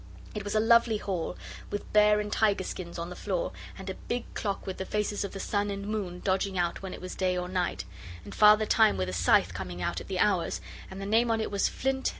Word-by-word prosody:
It 210 - -4
was 205 +1 -3
a - - +5
lovely 230 0 +4
hall, 185 -5 -3 0.3
with 205 - -5
bear 210 0 +6
and 210 0 -3
tiger 205 -3 +2
skins 175 -2 -6
on 170 +1 -5
the - - -6
floor, 185 -3 -2 0.3
and 190 -1 -9
a 190 - -2
big 240 +5 -4
clock 200 -2 -3
with 190 - -5
the - - -3
faces 210 -1 -1
of 200 - -4
the 195 - -7
sun 205 +1 -1
and 200 0 -4
moon 190 -5 -3
dodging 190 0 0
out 175 -1 0
when 190 -1 -6
it - - -7
was 185 0 -6
day 185 -1 0
or 180 0 -2
night, 180 - -2 0.4
and - - -9
Father 210 0 +6
Time 220 0 +4
with 95 0 -1
a - - -4
scythe 90 -1 +3
coming 90 -2 -6
out 90 - -2
at - - -11
the 190 - -3
hours, 185 -2 +1 0.3
and 190 - -8
the 195 - -5
name 225 +4 +3
on 225 -1 +2
it 220 - -2
was 200 -1 +2
'Flint. 265 0 -1
200 Hz, 250 wpm, -29 LUFS, 180-210 Hz, 0.4 s, bear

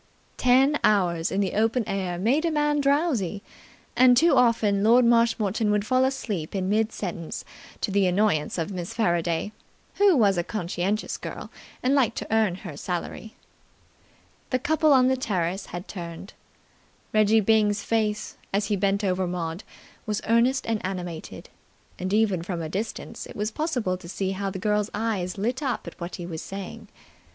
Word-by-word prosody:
Ten 265 +4 +4
hours 175 -5 +2
in 195 - +1
the 195 - -1
open 225 +3 +1
air 185 -3 -2
make 245 - +2
a 335 - +2
man 295 -1 +1
drowsy, 275 - +1 0.5
and 250 -1 +6
too 330 +2 +5
often 225 -5 +3
Lord 235 +3 +6
Marshmoreton 230 -3 +2
would 210 0 +1
fall 255 +2 +3
asleep 210 -11 -3
in 185 -1 -1
mid 220 +2 +1
sentence 170 -4 -5 0.4
to - - -1
the 195 -1 +3
annoyance 180 -5 +1
of 165 +3 -2
Miss 180 -2 -5
Faraday, 175 -2 0 0.5
who 400 -5 +5
was 200 -6 +3
a - - 0
conscientious 190 +2 -2
girl - - -7 0.3
and 255 +2 +3
liked 270 -6 +2
to - - -4
earn 220 -5 +2
her 160 -6 -6
salary. 180 +7 -5 1.1
The 255 - +1
couple 310 +4 +2
on 255 -2 +6
the 260 - +3
terrace 190 -6 -2
had 175 +1 -7
turned. 170 0 -8 0.8
Reggie 215 +1 +4
Byng's 210 -1 +2
face, 215 -2 -1
as 200 +1 +1
he 210 - +2
bent 200 +1 0
over 185 -1 0
Maud, 175 +1 -4 0.4
was 210 -1 -1
earnest 240 +4 +3
and 225 -2 -1
animated, 180 -3 -6 0.5
and 185 +1 -3
even 205 -4 +2
from 175 0 -4
a 155 - -4
distance 210 +6 -5
it - - -11
was 210 +2 -2
possible 245 - -1
to 175 -2 -12
see 190 +1 -2
how 195 +1 -2
the 190 - -5
girl's 210 +2 0
eyes 205 -5 -2
lit 240 +7 -1
up 265 -4 -2
at - - -10
what 170 +1 -5
he 175 - -7
was 165 -2 -6
saying. 195 -1 -8
210 Hz, 170 wpm, -25 LUFS, 185-235 Hz, 1.1 s, and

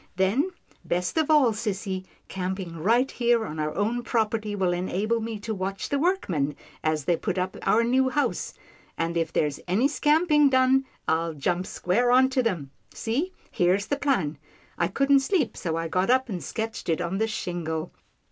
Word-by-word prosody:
Then, 195 - +2 0.3
best 180 +1 -1
of 315 -1 +2
all, 295 -6 +5
sissy, 200 -3 -3 0.2
camping 185 -2 -4
right 235 +10 +2
here 235 -2 +2
on 155 -3 -6
our 155 0 -1
own 225 +4 0
prop 225 -2 0
erty 215 -2 -3
will 185 -2 +1
enable 195 +6 -1
me 225 0 -4
to 220 +1 -3
watch 195 0 -4
the 285 - 0
workmen 185 - 0 0.3
as 155 -2 0
they 175 - +3
put 190 +3 -3
up 185 +1 -1
our 230 - +3
new 260 +2 +3
house, 290 +3 -1 0.4
and 165 +1 -1
if 165 -1 0
there's 145 -2 0
any 205 +10 +3
scamping 295 0 +3
done, 260 0 +4 0.2
I'll 165 0 0
jump 175 +5 -1
square 230 +8 +1
on 260 +1 +5
to 260 -1 +1
them. 175 - -2 0.2
See, 280 +12 -2 0.2
here's 185 +3 +2
the 285 - 0
plan. 190 - 0 0.4
I 170 - +1
couldn't 275 +8 +3
sleep, 270 - 0
so 165 -3 -3
I 165 0 -2
got 185 +6 0
up 260 0 +3
and 185 -5 -4
sketched 220 -4 -4
it 165 - +1
on 175 +2 -2
this 220 0 +1
shingle." 170 -6 -3
205 Hz, 185 wpm, -26 LUFS, 175-255 Hz, 0.4 s, all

